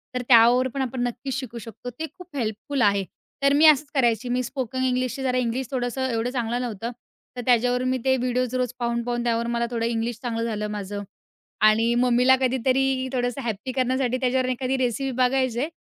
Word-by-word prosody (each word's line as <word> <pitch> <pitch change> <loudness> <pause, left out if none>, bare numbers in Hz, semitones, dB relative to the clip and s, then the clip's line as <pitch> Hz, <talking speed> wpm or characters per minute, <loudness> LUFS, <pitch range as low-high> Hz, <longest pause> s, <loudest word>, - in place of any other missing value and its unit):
तर 250 - 0
त्यावर 240 +2 +6
पण 275 - -2
आपण 255 -1 -3
नक्कीच 255 +3 -5
शिकू 240 -3 -7
शकतो 225 +2 -8
ते 320 - -2
खूप 360 -4 -13
हेल्पफुल 245 +4 -2
आहे. 200 -3 +3 0.4
तर 280 0 +5
मी 300 +3 +5
असंच 300 -2 +5
करायची. 240 -2 +1
मी 250 +1 +1
स्पोकन 260 0 -3
इंग्लिशची 255 0 -1
जरा 255 -1 +1
इंग्लिश 250 +1 -1
थोडंसं 260 0 -1
एवढं 230 0 -1
चांगलं 240 -1 -1
नव्हतं. 235 -1 -4 0.5
तर - - -2
त्याच्यावर 245 0 +3
मी 255 0 +1
ते 260 0 +4
व्हिडिओज 250 0 -1
रोज 250 -1 -1
पाहून-पाहून 240 0 -1
त्यावर 235 -1 0
मला 235 0 0
थोडं 230 -1 -1
इंग्लिश 230 0 -2
चांगलं 230 -2 -2
झालं 210 -2 -2
माझं 205 0 -5 0.6
आणि 225 +2 +3
मम्मीला 250 +1 +4
कधीतरी 260 +1 +1
थोडंसं 245 +1 -1
हॅपी 235 +1 -4
करण्यासाठी 255 0 0
त्याच्यावरून 255 0 +1
एखादी 255 +1 -1
रेसिपी 260 +1 -1
बघायचे 255 0 +1
250 Hz, 180 wpm, -24 LUFS, 235-260 Hz, 0.6 s, त्यावर